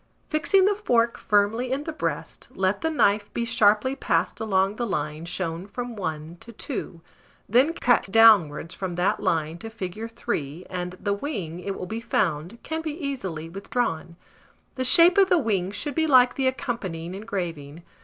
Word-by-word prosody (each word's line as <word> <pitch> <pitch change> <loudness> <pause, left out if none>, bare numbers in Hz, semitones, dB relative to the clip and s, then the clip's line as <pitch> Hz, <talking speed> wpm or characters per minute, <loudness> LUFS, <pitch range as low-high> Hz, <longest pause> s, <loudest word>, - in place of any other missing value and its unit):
Fixing 375 +5 +3
the 410 - +4
fork 235 - +1
firmly 215 +5 +1
in 275 +2 -1
the 320 - -5
breast, - - -4
let 190 +1 0
the 320 - 0
knife 205 -9 +2
be 235 - 0
sharply 230 +2 +3
passed 165 -8 0
along 195 -1 +1
the 240 - -2
line 150 -3 -3
shown 175 0 -4
from 240 +3 -6
1 160 -3 -5
to 235 - -12
2; 205 - -6 0.5
then 255 +9 +4
cut 245 - +1
downwards 195 -9 +5
from 185 -3 -4
that 180 +2 +1
line 160 +1 -1
to 225 - -7
fig. 215 +1 -6
3; 160 -6 -4
and 180 0 -4
the 200 -1 -1
wing, 200 - -4
it 195 +2 -4
will - - -5
be 220 +4 -5
found, 175 -2 -1
can 320 0 -3
be 310 -1 -5
easily 195 - -4
withdrawn. 170 -2 -3 0.6
The 260 - -2
shape 350 +8 +6
of 385 -1 +5
the 360 - +5
wing 205 - 0
should 280 +9 -4
be 320 +2 +1
like 255 -3 +6
the 265 -1 0
accompanying 190 -10 -3
engraving. 175 -7 -5
205 Hz, 175 wpm, -25 LUFS, 175-250 Hz, 0.6 s, shape